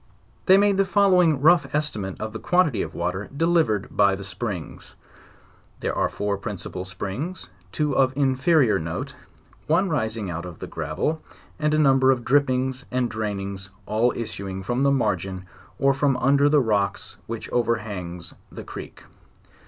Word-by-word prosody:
They 190 - +8
made 200 -1 +3
the 195 - +4
following 180 -7 +4
rough 165 0 +4
estimate 110 -11 -2
of 110 0 -5
the 110 - -5
quantity 175 - +2
of - - -5
water 90 +4 -3
delivered 160 - +1
by 100 -1 +4
the. 100 - -8
springs. 95 -2 -6 0.9
There - - -1
are - - +1
four 100 -1 -2
principal 95 -3 -5
springs, 105 - -5 0.2
two 150 -3 -1
of 130 -1 +4
inferior 135 -1 +3
note; 80 0 -4 0.5
one 185 +5 +2
rising 110 -8 -1
out 85 -1 -4
of 90 -2 -8
the - - -6
gravel, 80 - -2 0.4
and 150 0 +1
a - - +2
number 135 -3 +4
of 125 -3 +2
drippings 130 -1 +1
and 125 -1 -1
drainings, 100 -3 -4 0.2
all 115 +3 +2
issuing 95 -4 -5
from 120 +6 -1
the 140 - +4
margin, 95 -7 -1 0.3
or 135 0 +3
from 135 -1 +1
under 140 +2 +4
the 150 -1 +4
rock 105 -4 +1 0.3
which 115 -1 -5
overhangs 105 -8 -2 0.2
the - - -8
creek. - - -9
120 Hz, 155 wpm, -24 LUFS, 100-145 Hz, 0.9 s, They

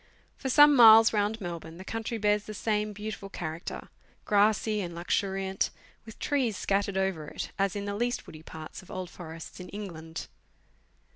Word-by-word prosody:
For 265 - -4
some 295 +2 +7
miles 225 -2 +9
round 210 +1 +1
Melbourne, 170 -3 -6
the 190 - -10
country 225 +2 -3
bears 210 -1 +1
the 215 - -7
same 210 0 0
beautiful 205 -1 -6
character 165 -3 -6 0.4
grassy 210 +1 +3
and 175 -2 -5
luxuriant, 190 +2 -1 0.4
with 220 - -10
trees 255 -8 0
scattered 200 0 0
over 190 -6 -1
it, - - -6
as 195 -1 +1
in 200 0 -3
the 200 0 -3
k'ust 240 +3 -1
woody 155 - -11
parts 160 -1 -9
of 185 - -18
old 185 -1 -5
forests 165 -1 -9
in 180 - -8
England. 165 -6 -7
200 Hz, 165 wpm, -29 LUFS, 175-215 Hz, 0.4 s, miles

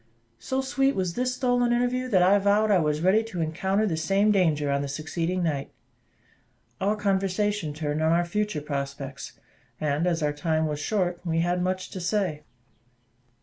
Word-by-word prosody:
So 260 - -2
sweet 270 +1 +1
was 185 -3 -1
this 250 +3 -1
stolen 245 -1 +1
interview, 245 +1 0
that 190 -7 +3
I 195 +3 +5
vowed 205 +2 +3
I 195 - +5
was 150 -1 0
ready 200 +5 +4
to 195 -6 -6
encounter 190 +6 0
the 180 -6 0
same 195 +6 +2
danger 155 -7 +2
on 140 0 +1
the 140 - -3
succeeding 165 +5 -2
night. 145 -4 -1 1.1
Our 205 +2 +1
conversation 200 -3 0
turned 150 0 -3
on 160 0 +3
our 170 +1 +3
future 210 -3 -2
prospects; 140 -1 -5 0.5
and, 150 +3 0
as 165 -3 0
our 150 0 +1
time 160 +1 0
was 150 -1 -2
short, 175 +1 -1
we 165 -2 0
had 175 +1 0
much 185 +1 -2
to 185 - -6
say. 180 -4 -1
180 Hz, 175 wpm, -26 LUFS, 155-205 Hz, 1.1 s, I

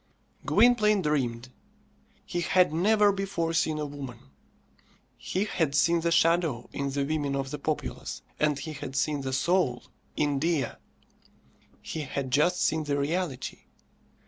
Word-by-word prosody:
Gwynplaine 215 -5 +4
dreamed. 125 -5 -1 0.8
He 175 - -2
had 180 -1 +3
never 205 +4 +4
before 195 -4 -2
seen 155 -1 +1
Woman. 140 - -7 0.8
He 190 +3 -2
had 160 -8 -1
seen 170 +3 +3
the 170 +1 0
shadow 165 -6 +2
in 140 0 -2
the 140 0 -1
women 145 -2 -1
of 135 -1 -3
the 150 - -4
populace, 155 +1 -4 0.2
and 150 -2 +2
he 155 +3 -6
had 140 -2 -7
seen 145 +1 0
the 135 -1 -3
soul 135 -2 +1 0.3
in 145 -2 +1
Dea. 160 -3 +1 1.2
He 160 - -5
had 140 -2 -4
just 160 +7 +3
seen 160 0 +1
the 145 -1 0
reality. 145 -2 -3
150 Hz, 140 wpm, -28 LUFS, 140-175 Hz, 1.2 s, Gwynplaine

